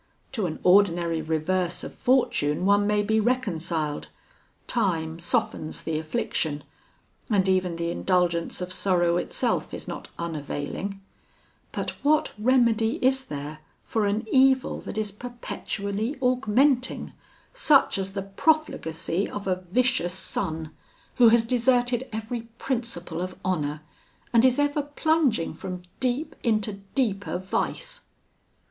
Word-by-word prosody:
To 215 -8 -1
an 155 - -4
ordinary 175 -3 +4
reverse 170 +3 -1
of - - -7
fortune 185 - +1
one 205 +1 +4
may 210 0 +2
be 220 +1 +2
reconciled; 170 - -1 0.6
time 165 -8 0
softens 165 -2 -1
the 155 -1 -1
affliction, 155 -1 -2 0.7
and 195 -4 +3
even 185 -2 +2
the 170 0 -2
indulgence 175 -2 0
of 180 0 -2
sorrow 175 -3 +2
itself - - -1
is - - -8
not - - -6
unavailing; 170 +4 -4 0.7
but - - -3
what 300 +1 +3
remedy 230 -1 +3
is 265 0 +3
there 150 +1 -6 0.2
for 215 -2 0
an 210 +2 -1
evil 265 0 +4
that - - -7
is 215 -2 -1
perpetually 220 0 -4
augmenting, 255 +1 +2 0.4
such 300 - +4
as 195 0 -3
the 195 -1 -3
profligacy 195 - 0
of 205 - -6
a 185 0 -1
vicious 240 -5 +1
son, 160 -4 -2 0.5
who 240 -2 +8
has 230 0 +4
deserted 245 +1 +2
every 225 +1 -5
principle 230 -11 -3
of 185 0 -4
honour, 150 -5 -1 0.5
and 230 0 +6
is 255 -1 +4
ever 290 0 +2
plunging 290 - +1
from 180 -1 -6 0.2
deep 260 +5 -1
into 215 -3 0 0.2
deeper 205 -9 0
vice? - - -2
200 Hz, 125 wpm, -26 LUFS, 175-245 Hz, 0.7 s, who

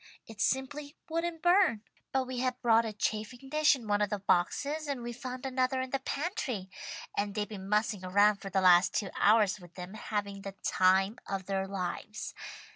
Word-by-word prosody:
It 220 -2 -8
simply 285 +4 -1
wouldn't 330 0 -2
burn. 350 - +4 0.3
But 265 -1 +1
we 255 -1 -4
had 255 0 -1
brought 230 -1 +5
a 220 - -2
chafing 220 +5 -3
dish 305 +1 +4
in 240 -5 -9
one 205 0 +2
of 205 - +2
the 210 - -1
boxes, 285 - 0
and 270 -4 -3
we 240 0 -4
found 255 +2 -6
another 260 0 0
in 260 0 -3
the 275 - 0
pantry, 265 - -3 0.4
and 200 0 -1
they've 210 -1 -1
been 195 -3 -8
mussing 210 -2 +1
around 205 +3 +4
for 200 0 -7
the 190 0 +1
last 180 -1 +6
two 200 -3 -1
hours 210 -1 +4
with 175 -1 -15
them, 180 +1 -7
having 205 -2 -4
the 195 0 -7
time 190 +4 +3
of 195 -1 -3
their 195 0 -1
lives. 195 +2 -4
215 Hz, 195 wpm, -31 LUFS, 195-260 Hz, 0.4 s, last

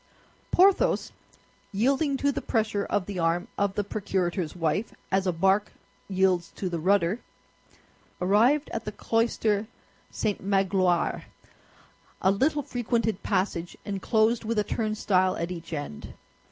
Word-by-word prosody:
Porthos, 380 +2 +3 0.6
yielding 270 +7 +1
to 285 +1 +1
the - - -3
pressure 215 -3 0
of 205 -3 0
the 195 -2 -5
arm 170 +2 +1
of 200 -1 0
the 205 - 0
procurator's 190 -4 -2
wife, 175 +6 -1 0.2
as 190 0 +2
a - - +3
bark 190 +4 +2 0.4
yields 185 -2 +2
to 185 - -3
the 170 -1 -3
rudder, 190 +3 +2 1.0
arrived 230 +11 +3
at 225 - -3
the 210 - -3
cloister 220 -1 0 0.4
St. 210 -2 -2
Magloire—a 190 -1 -1
little 290 +8 +1
frequented 230 -5 -1
passage, 185 -3 -1
enclosed 220 +3 +1
with 225 0 -2
a 210 - +3
turnstile 205 -4 +1
at 170 +2 -3
each 170 -2 -7
end. 145 - -6
200 Hz, 125 wpm, -27 LUFS, 185-225 Hz, 1.0 s, Porthos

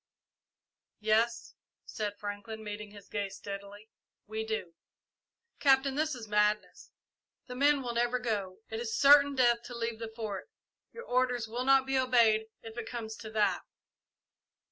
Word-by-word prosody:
"Yes," 220 +2 +1 0.3
said 205 -1 -4
Franklin, 205 +2 -6
meeting 210 0 -6
his 205 -1 -14
gaze 200 -2 -3
steadily, 200 +1 -8 0.4
"we 220 +1 -4
do." 220 -6 -4 0.9
"Captain, 270 -1 +4
this 305 +1 0
is 230 -3 -8
madness. 210 0 0 0.6
The 250 - -8
men 280 +2 +3
will 240 -1 -3
never 240 +1 +1
go. 210 -6 -3
It 220 - -3
is 230 -1 -2
certain 285 0 +7
death 240 -2 +4
to 240 -1 -7
leave 230 -1 -3
the 225 -1 -6
Fort. 215 - -5 0.4
Your 470 - -9
orders 250 -2 +1
will 240 +3 -3
not 270 0 +5
be 265 0 +1
obeyed, 230 -4 +4 0.2
if 225 +1 -7
it 225 - -6
comes 225 -2 -5
to 220 +1 -8
that." 215 -1 +2
225 Hz, 150 wpm, -31 LUFS, 210-250 Hz, 0.9 s, certain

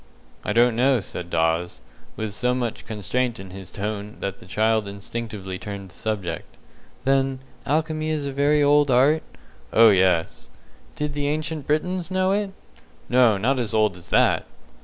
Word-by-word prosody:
"I - - -2
don't 120 +1 +4
know," 130 +1 +3
said 90 -3 -6
Dawes, 80 +1 0 0.4
with 110 -2 -3
so 125 +3 +1
much 120 -3 -3
constraint 115 +3 -1
in 95 -1 -9
his 95 -1 -8
tone 105 +1 -5
that 100 -1 -4
the - - -14
child 110 +1 +1
instinctively 100 -2 -6
turned 100 -2 -7
the - - -15
subject. 100 -7 -4 0.5
"Then, 135 0 +2 0.3
alchemy 155 +1 0
is 155 -2 -1
a 140 - -3
very 145 +2 +3
old 145 0 +4
art?" 135 +5 +4 0.5
"Oh, 115 -1 +7
yes." 90 -3 +1 0.5
"Did 150 0 -2
the 145 0 -1
Ancient 155 0 -2
Britons 180 +4 0
know 185 0 +1
it?" 205 0 0 0.6
"No, 120 -4 +5
not 130 +7 +1
as 110 -3 -2
old 110 -3 +3
as 90 - -12
that!" - - +3
115 Hz, 160 wpm, -24 LUFS, 100-145 Hz, 0.6 s, Oh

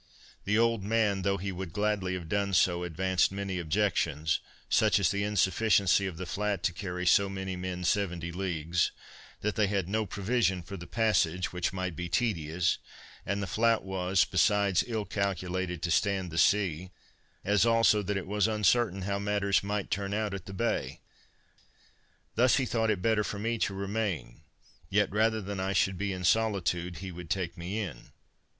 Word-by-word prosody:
The 105 +2 +2
old 115 -3 +2
man, 105 -2 +1
though 100 +1 +1
he 100 +1 -4
would 90 -2 -6
gladly 105 -3 0
have 85 -3 -6
done 100 +2 0
so, 90 0 +3
advanced 90 +2 +1
many 95 -2 -3
objections, 80 -3 0 0.3
such 110 -1 +3
as 100 -1 +2
the 100 0 -1
insufficiency 100 -1 +3
of 90 -4 -6
the 95 - -5
flat 100 0 -2
to 90 - +1
carry 90 -1 -4
so 100 +2 +4
many 95 -1 -4
men 90 0 -4
seventy 90 -3 0
leagues; 85 -2 -1 0.5
that 105 0 -1
they 105 -3 +2
had 100 -3 -1
no 110 +2 -1
provision 100 -2 0
for 100 +4 -8
the 85 -2 -9
passage, 95 -7 +1
which 90 -1 -1
might 95 -2 -3
be 90 +2 -5
tedious, 90 -7 0 0.5
and 100 +1 -1
the - - -1
flat 115 +3 +2
was, 95 -1 +1
besides 100 +1 +2
ill 110 -3 -2
calculated 95 -2 -2
to 85 - 0
stand 95 -1 +1
the 80 - -5
sea; 95 -2 +2 0.6
as 100 0 +3
also, 115 -2 +4
that 100 0 -2
it 95 - -4
was 105 +1 +1
uncertain 105 -2 +2
how 100 +1 -1
matters 100 -1 +1
might 100 0 -3
turn 100 0 -1
out 105 -2 -1
at 95 -3 -6
the - - -7
Bay; 115 +4 -2 1.3
thus 125 +1 +4
he 130 - +1
thought 115 -2 0
it 100 -4 0
better 110 -2 +2
for 105 - -4
me 115 +2 -2
to 100 - +1
remain; 100 - -3 0.5
yet 105 0 +2
rather 110 +1 +2
than 100 0 -5
I 95 +1 -1
should 95 -1 +1
be 100 0 -1
in 90 -1 -5
solitude, 90 -4 +1
he 95 - -5
would 90 -1 -9
take 90 -2 -2
me 90 +4 -5
in. 80 - -7
95 Hz, 180 wpm, -29 LUFS, 90-105 Hz, 1.3 s, so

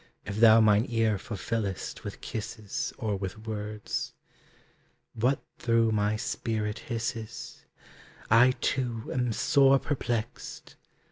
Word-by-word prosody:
If 105 -1 -4
thou 115 0 +8
mine 110 +1 +4
ear 110 -3 +2
fulfillest 105 -2 -3
With - - -7
kisses 115 +6 -4
or 110 -5 -1
with 95 +3 -6
words. 105 -1 -4 1.0
What 125 +4 +1 0.2
through 115 -1 +3
my 105 0 +1
spirit 110 -1 -2
hisses? 115 -1 -5 0.7
I, 120 +3 +7
too, 120 -4 -1
am 125 -2 0
sore 135 +5 +5
perplexed! 120 -5 -4
115 Hz, 110 wpm, -28 LUFS, 105-120 Hz, 1.0 s, thou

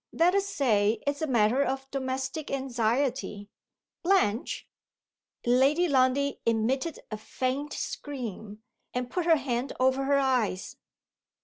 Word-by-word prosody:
"Let 345 +2 +3
us 395 0 +1
say 225 - +2
it's 285 +1 -1
a 315 - 0
matter 240 0 +3
of 270 -1 -2
domestic 265 +2 -3
anxiety. 245 -4 -1 0.5
Blanche 335 - +1 0.4
" - - -65
Lady 270 +8 +4
Lundie 275 0 +2
emitted 245 +8 0
a 215 - -3
faint 260 +6 -3
scream, 220 -6 -6 0.3
and 250 0 -2
put 360 -2 -1
her 330 - +7
hand 260 -2 -2
over 260 +1 +2
her 280 +1 +3
eyes. 250 -9 0
265 Hz, 125 wpm, -28 LUFS, 235-280 Hz, 0.5 s, her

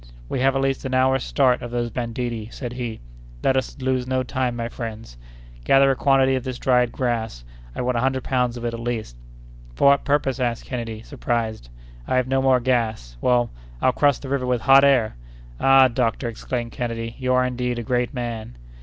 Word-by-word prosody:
"We - - -2
have 135 +1 +2
at 135 - +1
least 135 -1 -1
an 130 -1 -2
hour's 130 0 +3
start 130 -3 +2
of 120 - -6
those 120 -1 -2
banditti," 115 -1 -4
said 120 -3 -6
he; 120 -3 -5 0.4
"let 135 - +3
us 130 +2 -2
lose 130 -1 -1
no 130 0 0
time, 130 -2 -2
my 115 -1 -3
friends; 115 - -7 0.5
gather 135 - +5
a - - 0
quantity 135 -1 +3
of 130 -2 -1
this 130 -2 -4
dried 125 -2 +2
grass; 115 - -2 0.3
I - - -3
want 125 -1 0
a - - 0
hundred 130 0 0
pounds 125 -2 0
of 120 - -6
it, 120 - -2
at 115 - -5
least." 115 - -4 0.6
"For 140 - +5
what 140 0 +3
purpose?" 140 -2 0
asked 120 -2 -1
Kennedy, 115 -3 -5
surprised. 110 - -3 0.4
"I - - 0
have 130 -1 +2
no 135 0 +1
more 130 -1 +4
gas; 115 - -1
well, 120 -1 +2 0.3
I'll 130 - +3
cross 145 -1 +3
the 135 - -9
river 135 -2 -1
with 125 -2 0
hot 135 +4 +6
air!" 125 - +3 0.4
"Ah, 135 -1 +6
doctor," 120 0 -1
exclaimed 115 +1 -4
Kennedy, 115 -1 -4
"you 130 -1 0
are, 125 0 +3
indeed, 125 -1 -2
a 120 - -3
great 125 +1 0
man!" 115 - -5
125 Hz, 205 wpm, -23 LUFS, 115-130 Hz, 0.6 s, hot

